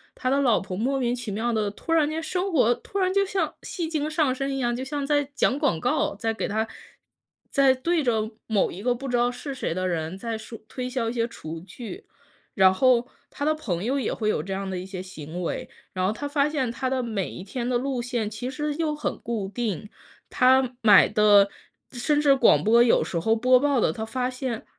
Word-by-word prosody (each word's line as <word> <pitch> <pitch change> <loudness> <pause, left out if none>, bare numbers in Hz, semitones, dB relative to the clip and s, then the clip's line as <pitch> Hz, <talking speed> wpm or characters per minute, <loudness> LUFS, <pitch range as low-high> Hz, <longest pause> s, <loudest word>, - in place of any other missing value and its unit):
他 255 - -2
的 275 - +2
老 250 -6 +3
婆 185 -1 -6
莫 265 +6 0
名 245 -2 0
其 245 -3 -5
妙 225 +4 -1
地 215 -2 0
突 330 - -7
然 315 -3 +4
间 320 +1 -3
生 365 +3 -2
活 245 -5 +4
突 400 - -8
然 370 -1 +1
就 395 0 +3
像 375 -6 -1
戏 335 -4 -4
精 305 -2 -1
上 305 -4 +1
身 270 +1 -2
一 - - -2
样， 240 -2 0
就 250 - -4
像 285 0 -3
在 290 0 +2
讲 270 - +2
广 290 - +1
告， 160 - 0
在 225 +2 -1
给 220 - -3
他 220 +2 0 0.9
在 275 -1 +5
对 335 +6 0
着 225 -4 0 0.2
某 215 -3 +1
一 185 - -8
个 245 +1 +1
不 270 +2 -6
知 245 - +1
道 240 0 +3
是 250 +3 -6
谁 255 -10 -3
的 185 +1 -2
人 165 +1 -3
在 230 +1 -4
说 225 +1 -9
推 250 -1 -4
销 245 -3 -1
一 - - -4
些 230 -1 0
厨 165 -8 -8
具， 230 - -9 0.5
然 190 -1 +5
后 250 +2 +3 0.2
他 285 - -6
的 310 - +3
朋 195 - -3
友 270 +5 0
也 240 - -1
会 215 -2 -1
有 150 - 0
这 195 +4 -5
样 195 0 -3
的 190 - -3
一 180 - -5
些 190 -1 -6
行 175 -2 -7
为， 170 - -3 0.2
然 185 0 -1
后 205 - 0
他 290 - -6
发 285 0 +2
现 265 -6 -1
他 255 +2 -2
的 260 -1 -1
每 215 -5 -2
一 180 - -8
天 240 +4 -4
的 250 - +1
路 260 0 -2
线 240 -3 -2
其 225 +4 -5
实 295 +2 -2
又 310 -1 -1
很 300 - -3
固 220 -4 -3
定。 210 -3 -3 0.4
他 255 0 +3
买 210 -3 +7
的 205 -1 +5 0.4
甚 290 +4 +1
至 280 -2 +5
广 245 - +5
播 230 +3 +5
有 240 - +4
时 170 - -2
候 220 +7 +2
播 255 +2 +4
报 280 -3 +2
的， - - +3
他 220 +6 -5
发 250 +3 -2
现 255 -3 -4
245 Hz, 255 characters per minute, -25 LUFS, 210-275 Hz, 0.9 s, 买